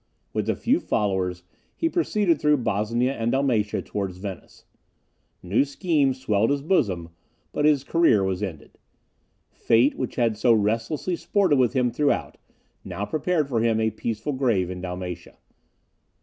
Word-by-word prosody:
With -, -, -1 dB
a -, -, +2 dB
few -, -, +1 dB
followers, 95 Hz, -4 st, -1 dB, 0.3 s
he 330 Hz, -, 0 dB
proceeded 210 Hz, -, +1 dB
through 150 Hz, 0 st, +4 dB
Bosnia 115 Hz, +2 st, 0 dB
and 115 Hz, -2 st, -1 dB
Dalmatia, 125 Hz, -7 st, 0 dB
towards 95 Hz, -3 st, -4 dB
Venice. 95 Hz, -1 st, -9 dB, 0.8 s
New 95 Hz, +8 st, +2 dB
schemes 140 Hz, -3 st, 0 dB
swelled 110 Hz, -3 st, +1 dB
his 140 Hz, 0 st, 0 dB
bosom; 95 Hz, -, 0 dB, 0.4 s
but 150 Hz, -, 0 dB
his 150 Hz, -3 st, +3 dB
career 155 Hz, -, +3 dB
was 95 Hz, 0 st, -1 dB
ended. 90 Hz, -8 st, -7 dB, 0.7 s
Fate, 120 Hz, +5 st, +3 dB
which 130 Hz, -, -4 dB
had 115 Hz, -3 st, +1 dB
so 120 Hz, +1 st, +4 dB
restlessly 115 Hz, -, 0 dB
sported 170 Hz, -3 st, +1 dB
with 125 Hz, -2 st, +2 dB
him 125 Hz, -3 st, +1 dB
throughout, 145 Hz, +4 st, -1 dB, 0.4 s
now 95 Hz, +2 st, -4 dB
prepared 155 Hz, +2 st, 0 dB
for 120 Hz, -5 st, 0 dB
him 115 Hz, -1 st, +2 dB
a 110 Hz, 0 st, +1 dB
peaceful 110 Hz, +5 st, -3 dB
grave 115 Hz, -9 st, +1 dB
in 90 Hz, -1 st, -6 dB
Dalmatia. 90 Hz, -1 st, -6 dB
115 Hz, 150 wpm, -24 LUFS, 100-145 Hz, 0.8 s, through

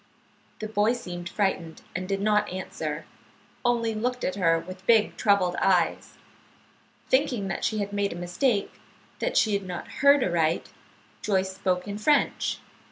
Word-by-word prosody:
"] -, -, -35 dB
The 215 Hz, -, -3 dB
boy 215 Hz, +2 st, +2 dB
seemed 175 Hz, -7 st, -6 dB
frightened, 185 Hz, -5 st, -2 dB
and 185 Hz, +1 st, -4 dB
did 195 Hz, 0 st, -1 dB
not 210 Hz, 0 st, +2 dB
answer, 160 Hz, -4 st, -4 dB, 0.6 s
only 235 Hz, -2 st, +1 dB
looked 250 Hz, +3 st, -2 dB
at 185 Hz, -, 0 dB
her 165 Hz, -4 st, +3 dB
with 185 Hz, +3 st, -8 dB
big, 220 Hz, -2 st, +4 dB
troubled 195 Hz, -4 st, +2 dB
eyes. 185 Hz, -3 st, +1 dB, 0.9 s
Thinking 260 Hz, -7 st, +1 dB
that -, -, -3 dB
she 220 Hz, -, 0 dB
had 205 Hz, -1 st, -3 dB
made 200 Hz, 0 st, 0 dB
a -, -, -5 dB
mistake, 195 Hz, +5 st, 0 dB, 0.5 s
that -, -, -1 dB
she 215 Hz, -, +3 dB
had 200 Hz, -, +1 dB
not 180 Hz, -2 st, -6 dB
heard 280 Hz, -1 st, +6 dB
aright, 165 Hz, -3 st, +1 dB, 0.5 s
Joyce 190 Hz, -2 st, 0 dB
spoke 185 Hz, -1 st, -1 dB
in 205 Hz, +1 st, -4 dB
French. 295 Hz, +6 st, +2 dB
200 Hz, 160 wpm, -26 LUFS, 180-215 Hz, 0.9 s, heard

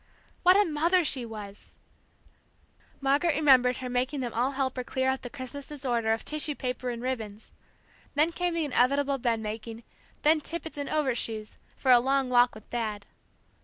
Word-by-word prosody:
What 365 Hz, +1 st, +6 dB
a 415 Hz, -, +4 dB
mother 335 Hz, +4 st, +2 dB
she 255 Hz, -5 st, +1 dB
was, 210 Hz, -2 st, -10 dB, 1.3 s
Margaret 285 Hz, +4 st, +2 dB
remembered 260 Hz, -4 st, +4 dB
her 255 Hz, -, -5 dB
making 255 Hz, +3 st, -1 dB
them 240 Hz, -2 st, -4 dB
all 250 Hz, +4 st, 0 dB
help 265 Hz, -1 st, -1 dB
her 255 Hz, -, -2 dB
clear 260 Hz, +1 st, 0 dB
up 265 Hz, -, -4 dB
the 245 Hz, -, -7 dB
Christmas 265 Hz, +3 st, -7 dB
disorder 245 Hz, -6 st, -1 dB
of 225 Hz, -, -1 dB
tissue 300 Hz, -1 st, -1 dB
paper 250 Hz, -1 st, -3 dB
and 235 Hz, 0 st, -5 dB
ribbons; 225 Hz, -5 st, -5 dB, 0.6 s
then 305 Hz, +3 st, +3 dB
came 350 Hz, 0 st, -2 dB
the 330 Hz, -2 st, 0 dB
inevitable 280 Hz, +1 st, +2 dB
bed 235 Hz, -2 st, 0 dB
making, 225 Hz, +2 st, -6 dB, 0.4 s
then 310 Hz, +1 st, +4 dB
tippets 320 Hz, -1 st, -2 dB
and 285 Hz, -, -3 dB
overshoes, 235 Hz, -7 st, -2 dB, 0.2 s
for 260 Hz, -, +2 dB
a 245 Hz, -, +8 dB
long 265 Hz, +1 st, +1 dB
walk 245 Hz, -1 st, +4 dB
with 215 Hz, -, -13 dB
Dad. 215 Hz, -4 st, -3 dB
260 Hz, 170 wpm, -28 LUFS, 235-290 Hz, 1.3 s, a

